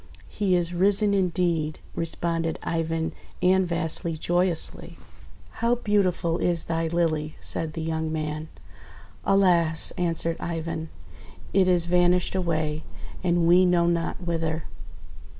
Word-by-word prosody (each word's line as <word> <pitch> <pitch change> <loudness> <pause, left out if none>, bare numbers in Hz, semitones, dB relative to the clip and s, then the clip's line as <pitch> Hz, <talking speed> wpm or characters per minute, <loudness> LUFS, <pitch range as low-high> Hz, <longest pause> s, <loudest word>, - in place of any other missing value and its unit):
"He 195 -3 +1
is 175 0 0
risen, 200 +3 +2
indeed 170 -5 0
!': - - -24
responded 165 0 -1
Ivan 165 -1 -1 0.3
and 185 0 +4
Vasily 165 -1 +1
joyously. 175 +1 0 0.6
"How 235 +1 +3
beautiful 190 -6 0
is 170 -2 0
thy 165 0 -1
Lily!'1' 160 -2 0
said 160 -2 -2
the 160 - -4
young 160 0 -2
man. 155 0 -3 0.8
"Alas!'1' 175 -6 +3
answered 165 -1 -1
Ivan, 165 -1 -4 0.6
"it 190 -1 +4
is 175 -2 +3
vanished 180 0 +2
away, 160 -4 -1 0.4
and 175 -2 +2
we 180 +2 +6
know 175 -1 +3
not 170 -1 0
whither." 165 -2 -2
170 Hz, 120 wpm, -25 LUFS, 160-180 Hz, 0.8 s, we